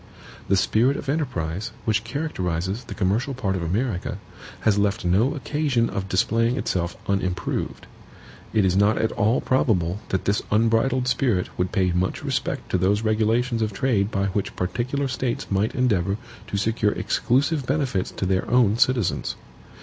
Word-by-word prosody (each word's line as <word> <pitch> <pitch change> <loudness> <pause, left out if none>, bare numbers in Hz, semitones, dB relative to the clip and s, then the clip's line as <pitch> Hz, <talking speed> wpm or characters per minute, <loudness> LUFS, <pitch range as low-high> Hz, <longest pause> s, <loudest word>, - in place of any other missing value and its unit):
The 100 - +3
spirit 120 +8 +2
of - - -6
enterprise, 105 - -2
which 110 -2 +1
characterizes 100 - -3
the - - -7
commercial 110 +7 0
part 100 -7 -1
of 95 - -2
America, 95 +3 -1 0.4
has 105 -2 +3
left 100 -2 0
no 105 - +2
occasion 140 -3 0
of 95 0 -4
displaying 115 +6 +2
itself 85 -8 -2
unimproved. 95 -2 -2 0.7
It 105 -3 +3
is 90 -1 +2
not 100 +2 +4
at 110 - +1
all 115 +1 +2
probable 100 -8 +1
that 95 - -1
this 100 +1 +1
unbridled 115 +4 +2
spirit 125 -7 0
would 90 0 -1
pay 95 -2 +2
much 90 +2 -1
respect - - -2
to 90 - +2
those 100 +4 +2
regulations 115 +2 +1
of 105 -2 -1
trade 105 -3 +1
by 100 -3 0
which 100 +1 -2
particular 125 +9 -1
States 125 -1 -2
might 100 +3 +1
endeavor 100 -7 +1 0.3
to 100 - -2
secure 105 0 +1
exclusive 140 +2 0
benefits 130 -10 0
to - - -4
their 95 0 0
own 115 -3 +3
citizens. 125 -8 +1
110 Hz, 155 wpm, -24 LUFS, 95-125 Hz, 0.7 s, not